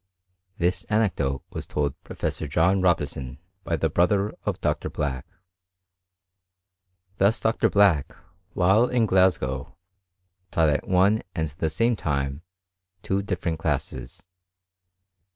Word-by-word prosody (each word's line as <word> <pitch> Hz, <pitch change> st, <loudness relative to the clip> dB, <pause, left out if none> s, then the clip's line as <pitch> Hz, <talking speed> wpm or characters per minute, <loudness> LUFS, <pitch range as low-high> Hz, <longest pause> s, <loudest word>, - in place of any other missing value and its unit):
This 90 Hz, +1 st, 0 dB
anecdote 80 Hz, -, 0 dB
was -, -, -6 dB
told 70 Hz, -2 st, -1 dB
Professor 80 Hz, -, -4 dB
Jd 85 Hz, +7 st, +2 dB, 0.2 s
bison 70 Hz, -2 st, -5 dB, 0.3 s
by -, -, -1 dB
the -, -, +1 dB
brother 100 Hz, +4 st, +1 dB
of -, -, -2 dB
Dr. -, -, -1 dB
Black. 65 Hz, -4 st, -3 dB, 1.9 s
Thus 100 Hz, +4 st, +3 dB
Dr. 110 Hz, -, +1 dB
Black, 100 Hz, -9 st, +3 dB, 0.4 s
while 95 Hz, +6 st, +4 dB
in 120 Hz, -3 st, +2 dB
Glasgow, 80 Hz, -, +1 dB, 0.7 s
taught 80 Hz, -4 st, +2 dB
( -, -, -8 dB, 0.4 s
and 80 Hz, -2 st, 0 dB
the 80 Hz, -, +1 dB
same 115 Hz, +8 st, +1 dB
time 70 Hz, -5 st, -2 dB, 0.6 s
two 95 Hz, +1 st, 0 dB
different 90 Hz, -4 st, -3 dB
classes. 80 Hz, +1 st, -3 dB
85 Hz, 110 wpm, -25 LUFS, 70-100 Hz, 1.9 s, while